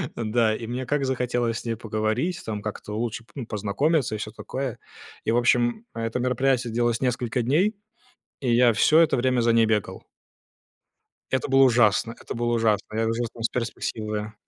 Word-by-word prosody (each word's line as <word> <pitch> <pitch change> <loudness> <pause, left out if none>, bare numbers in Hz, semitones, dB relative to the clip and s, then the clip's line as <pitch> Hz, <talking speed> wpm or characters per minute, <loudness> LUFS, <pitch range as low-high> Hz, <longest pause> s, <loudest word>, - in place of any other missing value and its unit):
да, 110 -1 +1
и 115 - -6
мне 125 +2 -3
как 145 0 0
захотелось 125 -3 -1
с - - -12
ней 115 -1 -1
поговорить, 110 - -2
там, 105 -2 -4
как-то 105 0 -6
лучше 115 0 -3
п - - -25
ну 130 -5 -5
познакомиться 110 +6 0
и - - -5
всё 105 - -5
такое. 130 +2 -5 0.5
И, 110 - +1
в 120 - +2
общем, 120 - +2
это 115 +2 -2
мероприятие 125 -1 +1
длилось 120 -1 +1
несколько 125 -1 0
дней, 180 - +2 0.7
и 125 -3 0
я 120 -1 +5
всё 155 +9 +5
это 165 - +4
время 125 0 +2
за 115 0 +3
ней 115 -1 +5
бегал. 105 -2 -1 1.3
Это 130 +1 0
было 135 0 +5
ужасно. 115 -2 +3
Это - - -7
было 120 0 0
ужасно. 110 -2 0
Я 115 - +1
жил 120 +1 -1
там 115 - -9
с - - +2
перспективою. 110 -3 -4
120 Hz, 180 wpm, -25 LUFS, 110-125 Hz, 1.3 s, я